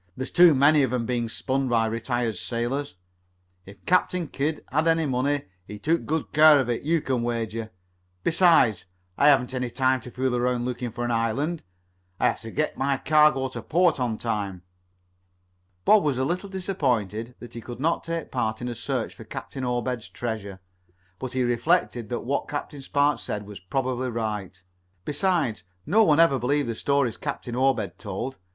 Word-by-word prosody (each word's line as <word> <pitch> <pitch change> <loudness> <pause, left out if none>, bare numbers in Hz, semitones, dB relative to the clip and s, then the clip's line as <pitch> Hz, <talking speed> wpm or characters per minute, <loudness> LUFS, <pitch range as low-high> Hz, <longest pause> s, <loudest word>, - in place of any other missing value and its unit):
There's 130 +1 -4
too 175 -3 +7
many 145 +3 +5
of 130 -3 +1
'em 125 -2 -1
being 120 -1 -1
spun 135 +3 -1
by 115 -2 +3
retired 115 0 -1
sailors. 120 +7 -3 0.7
If 100 -1 -14
Captain 180 -1 +2
Kidd 150 +2 -2
had 155 +4 +1
any 165 -1 +3
money, 135 +2 0 0.2
he 105 - -7
took 165 +10 0
good 160 0 -2
care 150 -1 +7
of 125 -3 0
it, 115 - -2
you 160 +2 +1
can 130 -4 -1
wager. 115 -2 -3 0.5
Besides, 165 - +4 0.3
I 145 - +4
haven't 135 -3 +4
any 125 -1 -2
time 130 +1 +1
to 125 - -9
fool 125 0 -1
around 125 0 0
looking 125 -1 -3
for 120 +2 -4
an 120 - -1
island. 125 +9 0 0.6
I - - +2
have - - +2
to 115 - -8
get 150 +7 -2
my 135 0 +1
cargo 150 -3 +3
to - - -7
port 175 -2 +2
on 120 -3 -1
time." 100 -6 -3 1.2
Bob 215 -1 +6
was 145 -5 0
a 130 - +1
little 180 +6 -2
disappointed 125 - -2
that 120 - -11
he 115 - -7
could 120 +1 -8
not 165 +4 0
take 165 -1 -4
part 110 -3 -1
in 125 - -4
a - - -3
search - - -3
for - - -11
Captain 135 - -7
Obed's 125 -1 -2
treasure, 105 -5 -5 0.6
but 130 -1 -5
he 130 -1 +1
reflected 120 -1 +1
that 120 - -2
what 140 +3 -2
Captain 145 -1 -5
Spark 145 +2 +1
said 105 -1 -5
was 105 -2 -9
probably 130 +6 -2
right, 105 -5 -4 0.4
resides, 155 - 0 0.2
no 210 +9 +4
one 155 -7 +4
ever 165 -6 +5
believed 140 +3 0
the - - -1
stories 140 0 0
Captain 135 -4 -5
Obed 125 -8 0
told. 110 +6 -5
130 Hz, 180 wpm, -25 LUFS, 115-145 Hz, 1.2 s, too